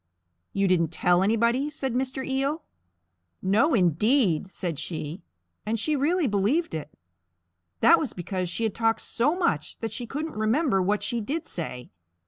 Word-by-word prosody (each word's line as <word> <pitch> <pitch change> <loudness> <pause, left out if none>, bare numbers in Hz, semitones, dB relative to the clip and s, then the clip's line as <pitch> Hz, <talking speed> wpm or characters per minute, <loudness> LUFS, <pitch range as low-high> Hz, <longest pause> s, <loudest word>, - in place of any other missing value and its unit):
"You 195 0 +1
didn't 175 -3 +3
tell 175 +2 +2
anybody?" 235 +7 +2
said 270 -4 -3
Mr. 260 +1 -2
Eel. 275 +4 -1 0.8
"No 220 - +3
indeed!" 190 - +2
said 170 -4 -4
she; 160 +1 -5 0.4
and 220 +1 -1
she 305 +7 0
really 320 +5 +1
believed 230 - +1
it. 155 -2 -4 0.9
That 335 - +7
was 285 - -2
because 185 0 -3
she 200 +6 -2
had 220 -3 0
talked 225 0 +1
so 290 +8 +1
much 160 - -1
that 225 -2 -4
she 240 +1 -4
couldn't 305 +6 -4
remember 220 - +1
what 205 +3 0
she 240 -2 -1
did 295 +9 -3
say. 125 -7 -6
225 Hz, 155 wpm, -26 LUFS, 185-275 Hz, 0.9 s, That